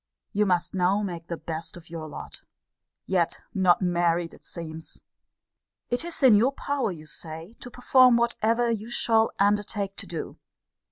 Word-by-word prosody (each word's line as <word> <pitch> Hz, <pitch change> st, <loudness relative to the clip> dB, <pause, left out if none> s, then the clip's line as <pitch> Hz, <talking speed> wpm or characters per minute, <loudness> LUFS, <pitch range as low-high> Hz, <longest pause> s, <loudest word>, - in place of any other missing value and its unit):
You 210 Hz, 0 st, +2 dB
must 175 Hz, -1 st, +1 dB
now 190 Hz, +2 st, +2 dB
make 170 Hz, -4 st, -5 dB
the 170 Hz, -, -4 dB
best 165 Hz, +2 st, -6 dB
of 170 Hz, -1 st, -14 dB
your 160 Hz, -2 st, -6 dB
lot. 150 Hz, -, -9 dB, 0.6 s
Yet 175 Hz, -3 st, 0 dB
not 185 Hz, -2 st, +3 dB
married, 175 Hz, -1 st, +1 dB
it -, -, -16 dB
seems! 160 Hz, -1 st, -8 dB, 0.9 s
It 245 Hz, +5 st, 0 dB
is 340 Hz, -4 st, -5 dB
in 255 Hz, -4 st, +8 dB
your 235 Hz, +7 st, +4 dB
power, 280 Hz, -6 st, -1 dB
you 155 Hz, -3 st, -9 dB
say, 160 Hz, +5 st, -8 dB
to 245 Hz, -, -9 dB
perform 250 Hz, 0 st, +5 dB
whatever 235 Hz, 0 st, +1 dB
you 220 Hz, 0 st, -3 dB
shall 225 Hz, -1 st, +3 dB
undertake 205 Hz, 0 st, +1 dB
to -, -, -6 dB
do. 165 Hz, -2 st, -6 dB
195 Hz, 160 wpm, -26 LUFS, 170-230 Hz, 0.9 s, in